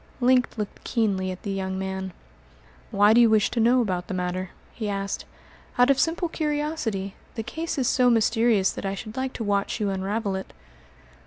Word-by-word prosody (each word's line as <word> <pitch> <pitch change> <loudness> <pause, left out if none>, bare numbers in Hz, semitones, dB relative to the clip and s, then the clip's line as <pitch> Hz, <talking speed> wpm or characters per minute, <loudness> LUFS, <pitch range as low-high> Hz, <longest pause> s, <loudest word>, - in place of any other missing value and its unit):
Link 250 0 +4
looked 210 -2 -5
keenly 200 -6 0
at 185 0 -7
the 200 - -3
young 190 -1 -3
man. 190 0 -4 0.8
"Why 205 0 +5
do 240 - +6
you 235 - +6
wish 215 -2 +3
to 235 - -1
know 240 +3 +4
about 180 -5 -2
the 190 - -3
matter?" 180 0 -2 0.2
he 215 -3 -4
asked. 195 0 -3 0.5
"Out 245 +2 +6
of 270 - +2
simple 335 +2 +1
curiosity. 295 - -2 0.2
The 225 - -3
case 320 +9 -4
is 260 -3 +1
so 250 -1 +4
mysterious 225 -3 +3
that - - -7
I 195 0 -2
should 215 +3 -8
like 260 0 -2
to 230 - -4
watch 200 +2 0
you 205 -2 0
unravel 200 +2 -2
it." 190 - -6
215 Hz, 190 wpm, -25 LUFS, 195-245 Hz, 0.8 s, do